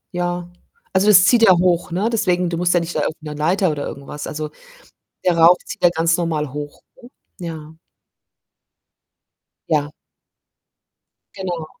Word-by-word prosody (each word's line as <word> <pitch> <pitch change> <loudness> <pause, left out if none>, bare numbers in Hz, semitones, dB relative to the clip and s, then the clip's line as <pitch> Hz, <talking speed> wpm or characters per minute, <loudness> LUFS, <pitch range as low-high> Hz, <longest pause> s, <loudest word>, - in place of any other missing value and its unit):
Ja. 175 0 -2 0.5
Also, 190 +2 +2
das 190 -3 +7
zieht 240 -2 +4
ja 190 -5 +7
hoch, 175 -1 +1
ne, 195 +6 0
deswegen 180 -5 +1
du 165 - -2
musst 175 0 +1
ja - - +5
nicht 170 +1 -5
da - - +1
irgend 160 0 -3
'ne 150 -1 -6
Leiter 170 +4 +1
oder 145 -1 -4
irgendwas 140 +1 -8
also, 155 0 -5 0.7
der 175 -2 +2
Rauch 170 +2 +7
zieht - - -9
ja 175 - +6
ganz 165 0 +1
normal 155 -5 -2
hoch, 145 0 -7 0.2
ne? 240 - -13 0.3
Ja. 160 -2 -8 1.9
Ja. 150 -1 0 1.4
Genau. 175 -5 -5
170 Hz, 155 wpm, -20 LUFS, 155-180 Hz, 1.9 s, das